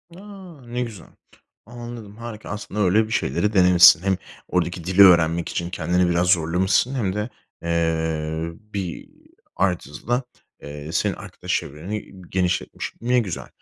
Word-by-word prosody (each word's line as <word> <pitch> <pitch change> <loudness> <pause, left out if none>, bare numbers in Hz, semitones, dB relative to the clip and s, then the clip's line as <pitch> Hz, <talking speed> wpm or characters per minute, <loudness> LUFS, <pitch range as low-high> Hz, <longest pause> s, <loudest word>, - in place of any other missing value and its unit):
A! - - -12 0.5
Ne 125 +1 -3
güzel. 110 -7 -6 0.6
Anladım, 120 -2 -9
harika. 115 -2 -8
Aslında 105 0 -5
öyle 105 +3 +3
bir - - -10
şeyleri 105 -3 0
denemişsin. 90 -3 +7
Hem 95 -1 +1 0.3
oradaki 90 -1 -1
dili 95 +3 +6
öğrenmek 85 -2 +5
için 85 0 -3
kendini 90 +1 +1
biraz 85 +1 +1
zorlamışsın 90 +9 +2
hem 100 -7 -1
de, 105 +3 -2 0.3
eee, 80 -1 -1 0.2
bir 95 -4 -5 0.5
artısı 90 -6 -2
da, 120 +2 +1 0.4
eee, 75 +1 -8
senin - - +1
arkadaş - - -6
çevreni 90 +9 -6 0.2
genişletmiş. 90 -1 -2
Ne 125 +1 +2
güzel. 100 -7 -4
90 Hz, 135 wpm, -23 LUFS, 85-105 Hz, 0.6 s, denemişsin